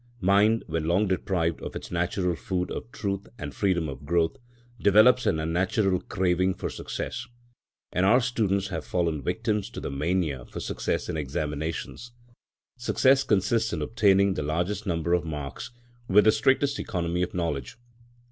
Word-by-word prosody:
Mind, 105 Hz, +3 st, +3 dB
when 80 Hz, -1 st, -2 dB
long 90 Hz, +6 st, +2 dB
deprived 90 Hz, -3 st, -1 dB
of -, -, -7 dB
its -, -, -7 dB
natural 90 Hz, +1 st, 0 dB
food 90 Hz, +1 st, -3 dB
of 115 Hz, -, -6 dB
truth 100 Hz, -3 st, -3 dB
and -, -, -6 dB
freedom 90 Hz, -5 st, +1 dB
of 70 Hz, 0 st, -7 dB
growth, 80 Hz, -, +1 dB, 0.5 s
develops 110 Hz, +6 st, +5 dB
an 80 Hz, -, +2 dB
unnatural 90 Hz, +4 st, +1 dB
craving 95 Hz, 0 st, +1 dB
for -, -, -4 dB
success; -, -, -5 dB, 0.6 s
and 90 Hz, -, +1 dB
our 115 Hz, +6 st, +6 dB
students 105 Hz, -6 st, 0 dB
have 85 Hz, -4 st, -4 dB
fallen 85 Hz, -4 st, -1 dB
victims 105 Hz, +8 st, -1 dB
to -, -, -7 dB
the -, -, -5 dB
mania 75 Hz, -2 st, -1 dB
for -, -, -7 dB
success -, -, -2 dB
in -, -, -3 dB
examinations. 75 Hz, -, -4 dB, 0.7 s
Success 135 Hz, +3 st, +3 dB
consists 110 Hz, +1 st, +1 dB
in 80 Hz, -3 st, -2 dB
obtaining 100 Hz, -, +3 dB
the 75 Hz, -, -3 dB
largest 90 Hz, +8 st, -2 dB
number 85 Hz, -1 st, 0 dB
of 90 Hz, -1 st, +2 dB
marks 75 Hz, -4 st, -6 dB, 0.4 s
with 105 Hz, +2 st, +6 dB
the 110 Hz, -, +6 dB
strictest 135 Hz, +5 st, +2 dB
economy 85 Hz, -1 st, -2 dB
of 90 Hz, -, -2 dB
knowledge. 80 Hz, -, -3 dB
90 Hz, 155 wpm, -26 LUFS, 80-105 Hz, 0.7 s, our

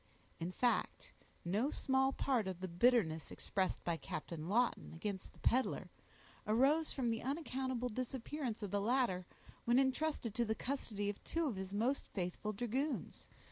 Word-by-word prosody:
In 170 Hz, +2 st, -2 dB
fact, 240 Hz, +5 st, 0 dB, 0.3 s
no 210 Hz, +10 st, +2 dB
small 265 Hz, -2 st, +2 dB
part 250 Hz, -7 st, +1 dB
of 185 Hz, -2 st, -3 dB
the 185 Hz, -, -3 dB
bitterness 175 Hz, -4 st, +3 dB
expressed 190 Hz, -2 st, -1 dB
by 170 Hz, -1 st, 0 dB
Captain 160 Hz, +1 st, -5 dB
Lawton 235 Hz, +4 st, +2 dB
against 190 Hz, +2 st, -4 dB
the -, -, -21 dB
peddler, 255 Hz, +2 st, +1 dB, 0.6 s
arose 275 Hz, +9 st, +4 dB
from 245 Hz, -4 st, 0 dB
the 225 Hz, -, -1 dB
unaccountable 260 Hz, -3 st, -1 dB
disappearance 250 Hz, 0 st, -3 dB
of 200 Hz, -, -3 dB
the 200 Hz, 0 st, +1 dB
latter, 215 Hz, -6 st, +2 dB, 0.4 s
when 240 Hz, +1 st, +5 dB
intrusted 265 Hz, -3 st, +1 dB
to 240 Hz, -, +2 dB
the 220 Hz, -1 st, 0 dB
custody 220 Hz, -7 st, -2 dB
of 205 Hz, 0 st, -3 dB
two 330 Hz, 0 st, 0 dB
of 260 Hz, -8 st, 0 dB
his 190 Hz, 0 st, -5 dB
most 235 Hz, +7 st, +1 dB
faithful 185 Hz, +3 st, -3 dB
dragoons. 245 Hz, +7 st, -2 dB
235 Hz, 155 wpm, -37 LUFS, 195-265 Hz, 0.6 s, when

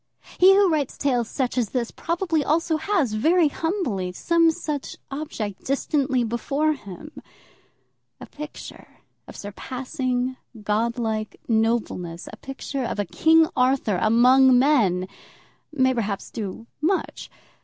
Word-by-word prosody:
He 380 Hz, +2 st, +8 dB
who 400 Hz, 0 st, +5 dB
writes 305 Hz, -6 st, -1 dB
tales 245 Hz, -5 st, 0 dB
such 255 Hz, -2 st, -1 dB
as 225 Hz, -4 st, 0 dB
this, 240 Hz, -3 st, -2 dB
probably 335 Hz, -2 st, -1 dB
also 320 Hz, +2 st, +1 dB
has, 315 Hz, -, 0 dB
very 320 Hz, +8 st, +3 dB
humbly, 280 Hz, -, -2 dB
some 335 Hz, -, +3 dB
such 305 Hz, -4 st, -4 dB
object 235 Hz, -9 st, -5 dB
distantly 270 Hz, -2 st, 0 dB
before 275 Hz, +7 st, 0 dB
him. 265 Hz, -, -10 dB, 1.1 s
A -, -, -8 dB
picture 300 Hz, +1 st, -10 dB, 0.4 s
of -, -, -11 dB
surpassing 255 Hz, +4 st, -3 dB, 0.3 s
godlike 220 Hz, 0 st, -1 dB
nobleness, 220 Hz, -7 st, -1 dB
a -, -, -9 dB
picture 270 Hz, +1 st, -5 dB
of 235 Hz, -, -3 dB
a 205 Hz, -, -1 dB
King 320 Hz, -, +4 dB
Arthur 250 Hz, -7 st, +2 dB
among 250 Hz, +3 st, +5 dB
men, 220 Hz, -10 st, +3 dB, 0.6 s
may 260 Hz, -3 st, +2 dB
perhaps 210 Hz, -5 st, -3 dB
do 215 Hz, +1 st, -6 dB, 0.2 s
much. 370 Hz, +5 st, -1 dB
260 Hz, 125 wpm, -24 LUFS, 220-310 Hz, 1.1 s, He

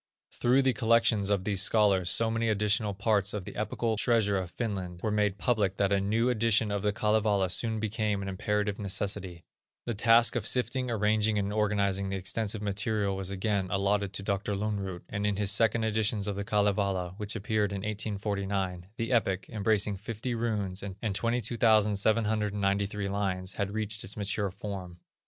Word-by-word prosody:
Through 130 Hz, +3 st, +2 dB
the 130 Hz, -1 st, +3 dB
collections 115 Hz, -2 st, +3 dB
of 100 Hz, -2 st, +1 dB
these 100 Hz, -2 st, +1 dB
scholars 100 Hz, -4 st, +3 dB
so 115 Hz, +6 st, +3 dB
many 115 Hz, 0 st, 0 dB
additional 105 Hz, 0 st, +1 dB
parts 100 Hz, 0 st, +1 dB
of 100 Hz, -3 st, -4 dB
the -, -, -8 dB
epical 110 Hz, +1 st, -1 dB
treasure 110 Hz, -3 st, +2 dB
of 95 Hz, -2 st, -2 dB
Finland 95 Hz, -5 st, -4 dB
were 110 Hz, -, 0 dB
made 105 Hz, -2 st, +1 dB
public 105 Hz, -5 st, 0 dB
that 100 Hz, -1 st, +1 dB
a 100 Hz, -1 st, +2 dB
new 110 Hz, +4 st, +1 dB
edition 115 Hz, -3 st, +2 dB
of 100 Hz, -1 st, -1 dB
the 105 Hz, 0 st, +1 dB
Kalevala 105 Hz, -3 st, +1 dB
soon 110 Hz, +4 st, -1 dB
became 105 Hz, -2 st, -1 dB
an -, -, -5 dB
imperative 105 Hz, +1 st, -1 dB
necessity. 95 Hz, -3 st, -3 dB, 0.4 s
The 120 Hz, -, -2 dB
task 115 Hz, +2 st, +4 dB
of 115 Hz, -2 st, -1 dB
sifting, 125 Hz, 0 st, 0 dB
arranging, 110 Hz, -1 st, +1 dB
and 100 Hz, 0 st, -1 dB
organizing 100 Hz, -2 st, 0 dB
the 95 Hz, -, -2 dB
extensive 100 Hz, +3 st, -2 dB
material, 100 Hz, 0 st, -1 dB
was 95 Hz, -1 st, -4 dB
again 100 Hz, 0 st, -1 dB
allotted 100 Hz, 0 st, 0 dB
to 100 Hz, -, -4 dB
Dr. 100 Hz, 0 st, -1 dB
Lönnrot, 100 Hz, -3 st, -3 dB
and 100 Hz, -, -4 dB
in 105 Hz, -, 0 dB
his 100 Hz, 0 st, +1 dB
second 115 Hz, +1 st, +2 dB
editions 110 Hz, -1 st, +1 dB
of 105 Hz, -1 st, -2 dB
the 100 Hz, -, -3 dB
Kalevala, 100 Hz, -3 st, 0 dB
which 105 Hz, -2 st, -3 dB
appeared 105 Hz, -1 st, 0 dB
in 100 Hz, -1 st, -4 dB
1849, 100 Hz, -3 st, -3 dB
the 115 Hz, +2 st, -2 dB
epic, 100 Hz, -6 st, +1 dB
embracing 105 Hz, -2 st, +1 dB
fifty 115 Hz, +4 st, -4 dB
runes 105 Hz, -5 st, -2 dB
and 100 Hz, +2 st, -4 dB
22,793 105 Hz, -3 st, +1 dB
lines, 95 Hz, -2 st, -2 dB
had 100 Hz, -1 st, -2 dB
reached 110 Hz, 0 st, -3 dB
its 105 Hz, -, -6 dB
mature 100 Hz, 0 st, -1 dB
form. 95 Hz, -2 st, -7 dB
105 Hz, 170 wpm, -29 LUFS, 100-110 Hz, 0.4 s, task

